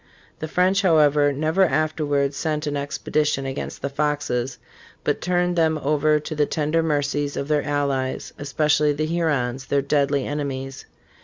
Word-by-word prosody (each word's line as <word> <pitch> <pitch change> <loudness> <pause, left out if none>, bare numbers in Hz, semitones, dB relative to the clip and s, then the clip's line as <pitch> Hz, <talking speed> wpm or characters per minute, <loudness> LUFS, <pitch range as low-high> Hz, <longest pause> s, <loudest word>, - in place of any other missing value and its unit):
* - - -31
The 155 - -4
French, 185 +4 +2
however, 150 -5 +4
never 155 +7 +1
afterwards 150 -4 0
sent 155 -1 -2
an 145 -1 -2
expedition 145 0 -1
against 135 +1 -5
the 140 - -1
Foxes, 140 -4 -1 0.5
but - - 0
turned 180 0 +1
them 160 -2 +2
over 150 +1 +2
to 150 +1 -6
the 150 -1 +1
tender 155 +1 0
mercies 145 -2 -1
of 140 - -3
their 150 -1 +2
allies, 140 -3 -2
especially 150 +1 +2
the 155 +2 -1
Hurons, 140 -6 -1
their 140 -1 +1
deadly 140 -1 +1
enemies. 135 -2 -4
150 Hz, 155 wpm, -23 LUFS, 140-155 Hz, 0.5 s, however